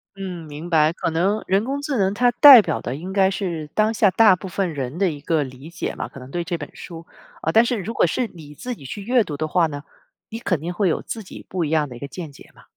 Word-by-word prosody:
嗯， 180 -4 -7
明 150 +3 -8
白， 155 -2 +4
可 165 -1 -3
能 190 +6 0
人 195 +2 +2
工 275 +4 -3
智 285 -3 -2
能 195 -2 +1
它 245 +3 +3
代 255 -1 +10
表 - - -3
的 125 - -4
应 180 +6 -7
该 190 -1 +4
是 170 -6 -4
当 215 +1 +2
下 210 -2 +4
大 215 -3 +6
部 190 - -9
分 185 -2 -2
人 135 +1 -4
的 195 0 +2
一 145 - -9
个 155 0 0
理 130 +3 -10
解 170 - -5
吧， - - -4
可 - - -11
能 130 +1 -12
对 175 -1 -2
这 170 0 -3
本 - - -8
书， 165 -2 -10 0.4
啊， 160 - 0
但 225 +6 +6
是 240 0 -1
如 215 +3 -5
果 - - +3
是 240 +9 -1
你 150 -4 -12
自 250 - -5
己 140 - -14
去 200 +9 -6
阅 240 +1 +3
读 145 -5 -6
的 155 - -2
话 165 +1 +2
呢， 145 -1 -7 0.5
你 225 - -6
肯 180 -8 -1
定 170 +4 -5
会 190 0 +1
有 - - -1
自 225 -2 -6
己 - - -12
不 180 -2 -2
一 155 - -2
样 155 -2 +1
的 125 - -10
一 120 - -10
个 140 - -6
见 160 0 -8
解 - - -16
嘛。 - - -18
175 Hz, 305 characters per minute, -22 LUFS, 155-210 Hz, 0.5 s, 代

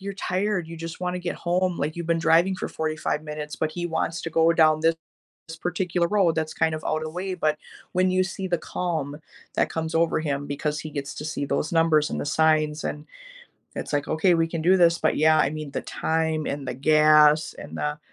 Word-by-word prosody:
you're 200 +1 -5
tired, 190 -1 -1
you 165 - -8
just 165 0 -7
wanna 180 0 -2
get 175 -1 -3
home. 180 +1 0
Like, 150 +2 -2
you've 170 -1 -4
been 170 0 +2
driving 170 +3 +3
for - - -4
45 155 -1 -2
minutes, 150 -1 -6
but 155 - -1
he 175 +1 -3
wants 165 0 -2
to 165 - -4
go 165 +1 +4
down 155 -2 +4
this 165 +1 +2 0.7
particular 175 -1 0
road 190 -4 +2
that's 160 -1 -2
kind 160 0 +1
of 155 - -8
out 155 - 0
of 155 - -4
the - - -4
way 185 +3 -4
but 155 -4 0 0.4
when 185 0 +2
you 185 0 +3
see 190 0 -5
the 175 -1 +1
calm 160 -6 -3 0.4
that - - +2
comes 160 0 -3
over 165 0 +2
him 145 -2 -2
because 150 +1 -3
he 155 - -7
gets 140 -2 -5
to 150 - -6
see 155 -2 -3
those 150 - -1
numbers 165 -3 +3
and - - -2
the - - -4
signs, 155 0 +2
and 150 +1 -4 0.7
that's - - -5
like, 145 0 -1
"Okay, 160 +3 +3
we 165 -1 +2
can 165 -1 -4
do 185 +3 +5
this." 170 -1 +4
But, - - +1
yeah, 155 +1 +5
I 140 - +3
mean, 155 -1 -6
the - - -3
time 160 -1 -1
and 140 -1 -4
the - - -3
gas 150 +2 +5
and - - -8
the 150 +1 -2
160 Hz, 230 wpm, -25 LUFS, 155-175 Hz, 0.7 s, do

